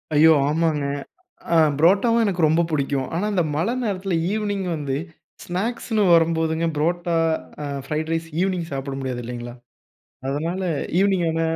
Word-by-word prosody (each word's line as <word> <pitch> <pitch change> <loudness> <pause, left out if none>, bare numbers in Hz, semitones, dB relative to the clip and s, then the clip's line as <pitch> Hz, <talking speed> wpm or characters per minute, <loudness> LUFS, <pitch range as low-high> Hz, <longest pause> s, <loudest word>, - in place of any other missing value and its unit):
ஐயோ! 160 +2 +7 0.2
ஆமாங்க. 155 -2 +1 0.7
அ - - +5 0.2
புரோட்டாவும் 205 +8 +4
எனக்கு 180 -4 -1
ரொம்ப 165 +2 +3
புடிக்கும். 140 -3 -1
ஆனா, 195 +5 0
இந்த 180 -3 +2
மழை 195 +10 0
நேரத்தில 195 -4 -2 0.2
ஈவ்னிங் 205 -2 -1
வந்து, 140 -2 -2 0.5
ஸ்நாக்ஸ்னு 215 +3 -1
வரும்போதுங்க, 165 0 +2
ப்ரோட்டா, 170 +2 0 0.5
அ - - -3 0.2
ஃப்ரைட் 155 +2 -2
ரைஸ், 165 0 -3
ஈவினிங் 185 -3 0
சாப்பிட 135 0 -4
முடியாது 125 -2 -3
இல்லைங்களா? 120 0 -6 0.8
அதனால 165 +7 -2 0.4
ஈவினிங்கான 175 -5 +1
165 Hz, 130 wpm, -23 LUFS, 150-190 Hz, 0.8 s, ஐயோ